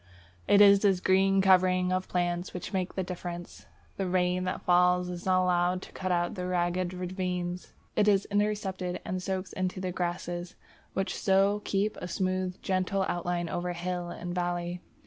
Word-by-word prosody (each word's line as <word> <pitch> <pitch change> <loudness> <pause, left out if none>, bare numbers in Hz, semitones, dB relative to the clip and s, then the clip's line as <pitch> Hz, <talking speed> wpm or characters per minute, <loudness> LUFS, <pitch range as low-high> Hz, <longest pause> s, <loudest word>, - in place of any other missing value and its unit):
It 205 - +6
is 200 -1 +8
this 195 -3 +3
green 195 +1 +3
covering 185 -1 +4
of 185 0 -1
plants 175 0 -1
which 180 - -6
makes 185 -1 -2
the 190 - -1
difference. 175 -1 -7 0.3
The 195 - -1
rain 180 0 +1
that 185 - -3
falls 180 0 +3
is 175 +1 -6
not 185 0 +4
allowed 180 0 +1
to - - -12
cut 185 -1 -3
out 175 +2 0
ragged 180 -1 -1
ravines; 180 -1 -4 0.2
it 210 - +3
is 200 -1 +4
intercepted 200 -3 -1
and 185 0 -3
soaks 190 0 -3
into 185 0 -2
the 185 -1 -2
grasses, 175 0 -3 0.4
which 195 0 -1
so 195 +1 +2
keep 205 +2 0
a 180 - -5
smooth, 185 +1 -2
gentle 190 +1 0
outline 175 0 -1
over 175 +1 -2
hill 175 0 -3
and 175 0 -5
valley. 175 0 -2
180 Hz, 165 wpm, -29 LUFS, 175-190 Hz, 0.4 s, is